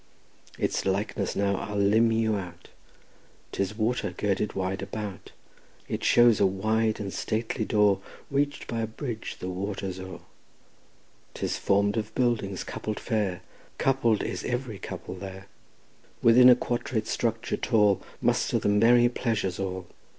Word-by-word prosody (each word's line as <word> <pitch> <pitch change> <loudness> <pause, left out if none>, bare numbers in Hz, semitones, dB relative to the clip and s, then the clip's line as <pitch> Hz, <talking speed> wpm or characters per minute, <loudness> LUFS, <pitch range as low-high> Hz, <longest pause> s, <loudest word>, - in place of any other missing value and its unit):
Its - - 0
likeness 100 +1 -1
now 100 -1 +1
I'll 105 +2 -5
limn 110 +3 +4
you 110 -1 +1
out: 90 -4 -7 0.8
'Tis 100 +2 -2
water 110 -2 0
girdled 105 0 0
wide 95 +1 -2
about; 100 -1 -6 0.6
It - - -4
shows 120 -2 +5
a - - +5
wide 110 +3 0
and 100 -2 -4
stately 110 +1 -2
door 105 -2 +3 0.3
Reached 145 +1 0
by 115 -1 -3
a 110 - -1
bridge 110 0 -6
the 90 - -5
water 95 +1 -3
o'er; 95 -2 -8 1.1
'Tis - - -2
form'd 100 +2 +2
of 110 -1 -3
buildings 115 -7 0
coupled 110 -1 -5
fair, 100 -6 -1 0.3
Coupled 120 -5 +2
is - - -4
every 120 -5 -3
couple - - -7
there; 95 0 -8 0.8
Within 125 +2 +8
a 125 - +9
quadrate 120 -2 -2
structure 115 0 -1
tall 105 -5 +3 0.2
Muster - - +2
the - - 0
merry 120 +4 +5
pleasures 115 -6 -1
all. 95 -1 -3
105 Hz, 140 wpm, -27 LUFS, 95-115 Hz, 1.1 s, a